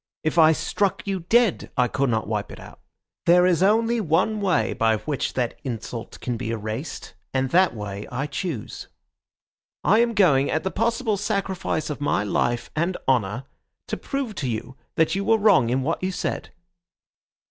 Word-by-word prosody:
If 155 +1 +1
I 160 0 +8
struck 195 +4 -1
you 195 -2 -1
dead 235 -5 +3
I 125 - +4
could 135 +3 0
not 110 -3 0
wipe 105 -1 -3
it - - -10
out. - - -13 0.5
There 180 +1 +6
is 180 -2 +2
only 225 +4 +3
one 190 +5 +1
way 185 -5 +1
by 110 -1 +2
which 135 +6 -3
that 125 -2 -2
insult 115 -2 -6
can 120 -2 -2
be 110 - -4
erased, 115 +6 -5 0.2
and 130 0 0
that 185 -5 +4
way 100 -1 -6
I 130 +3 -2
choose. 150 - -5 1.0
I 215 - +4
am 235 -1 +2
going, 145 -9 +4
at 155 - 0
the 190 - -2
possible 230 0 0
sacrifice 195 -6 -2
of 145 - -6
my 145 - +1
life 120 +3 -1
and 170 +4 0
honour, 120 -2 +1 0.5
to - - -1
prove 275 -5 -4
to 130 - -1
you 115 +3 -4 0.2
that 160 - +2
you 195 +1 -1
were 225 +2 +4
wrong 200 - +4
in 130 +2 0
what 165 +5 -1
you 185 0 -1
said." - - -3
155 Hz, 180 wpm, -24 LUFS, 120-195 Hz, 1.0 s, I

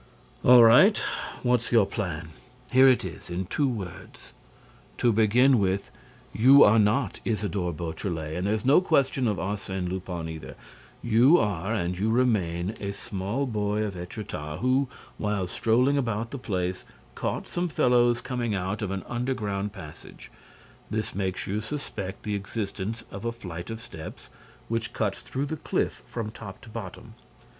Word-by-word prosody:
"All 125 -1 +9
right. 155 - +7 0.5
What's 125 -1 +1
your 115 -4 +5
plan?" 85 -7 -4 0.4
"Here 130 +1 +7
it 130 -6 +4
is, 85 - -8
in 90 +2 -3
two 140 - 0
words. 100 -8 -8 0.7
To 120 -2 +3
begin 120 +4 +4
with, 95 0 0 0.4
you 135 +5 +7
are 110 +2 +6
not 105 +6 +1
Isidore 105 -5 -1
Beautrelet 80 -1 -4
and 90 +2 -1
there's 110 +2 -1
no 140 +7 +6
question 140 -7 +2
of 105 -3 0
Arsène 95 -2 -3
Lupin 90 -2 -4
either. 80 -1 -8 0.5
You 120 +8 +6
are 100 - -1
and 90 -3 -2
you 105 +3 +1
remain 105 -7 +1
a 100 0 -3
small 100 +7 -3
boy 105 -3 -1
of 105 -2 -3
Étretat, 90 -4 -6
who, 130 +2 +2 0.3
while 105 -3 0
strolling 125 +9 +2
about 115 -2 -2
the 140 - -5
place, 90 -5 -2 0.3
caught - - -3
some 175 +1 -1
fellows 120 -4 +3
coming 120 -4 -2
out 95 +3 -2
of 105 - -2
an 95 -2 -3
underground 105 -5 -2
passage. 80 -7 -12 0.6
This 110 0 -3
makes 95 -1 -2
you 105 +2 -2
suspect 110 -7 -6
the 105 - -2
existence 105 +1 -4
of 100 - -7
a 115 - -1
flight 90 -7 -8
of 115 0 -5
steps 80 -9 -10 0.4
which 115 -1 -2
cuts 100 -3 -1
through 135 +2 -3
the 155 +2 -4
cliff - - -2
from 110 -3 -4
top 100 -4 -9
to - - -13
bottom." 110 +1 -8
105 Hz, 155 wpm, -27 LUFS, 95-120 Hz, 0.7 s, All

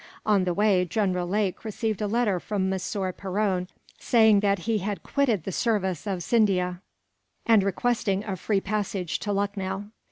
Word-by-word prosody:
On 200 -3 +3
the 180 - 0
way, 200 -2 +3
General 180 -1 -1
Lake 200 0 -1
received 220 -1 -3
a 210 - 0
letter 210 -4 +1
from 195 0 -2
Monsieur 190 0 -2
Perron, 190 -1 -1 0.3
saying 220 -3 +5
that 200 -1 +2
he 225 -2 +1
had 200 +1 -4
quitted 240 - +1
the 195 - -4
service 190 -4 -1
of 185 -3 -2
Scindia, 180 -4 +1 0.6
and 225 -3 +5
requesting 200 0 0
a 200 -3 -3
free 195 +2 0
passage 195 -4 -2
to 205 - -3
Lucknow. 200 0 -2
200 Hz, 160 wpm, -26 LUFS, 185-215 Hz, 0.6 s, saying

